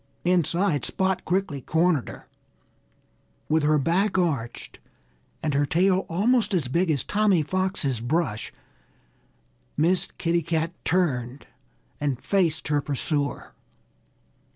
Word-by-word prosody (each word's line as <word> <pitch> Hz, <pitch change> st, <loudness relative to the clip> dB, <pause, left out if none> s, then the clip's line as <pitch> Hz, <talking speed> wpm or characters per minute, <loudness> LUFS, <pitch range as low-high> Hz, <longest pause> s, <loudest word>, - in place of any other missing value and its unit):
Inside 175 Hz, -3 st, +1 dB
Spot 190 Hz, -1 st, 0 dB
quickly 180 Hz, -7 st, -1 dB
cornered 160 Hz, -1 st, +1 dB
her. -, -, -11 dB, 1.2 s
With 160 Hz, +1 st, +2 dB
her 150 Hz, +1 st, +3 dB
back 185 Hz, +7 st, +1 dB
arched 140 Hz, -10 st, -2 dB, 0.6 s
and 155 Hz, -2 st, 0 dB
her 145 Hz, +1 st, +1 dB
tail 185 Hz, +4 st, +2 dB
almost 215 Hz, +5 st, +2 dB
as 155 Hz, -8 st, 0 dB
big 170 Hz, +7 st, +1 dB
as 145 Hz, -5 st, +1 dB
Tommy 205 Hz, -6 st, +2 dB
Fox's 185 Hz, -, -1 dB
brush, 120 Hz, -4 st, -1 dB, 1.3 s
Miss 175 Hz, +4 st, +2 dB
Kitty 170 Hz, 0 st, +1 dB
Cat 165 Hz, +1 st, -1 dB
turned 140 Hz, -8 st, 0 dB, 0.5 s
and 140 Hz, -4 st, -1 dB
faced 175 Hz, -7 st, 0 dB
her 145 Hz, -1 st, +2 dB
pursuer. 145 Hz, 0 st, -2 dB
165 Hz, 110 wpm, -25 LUFS, 145-185 Hz, 1.3 s, her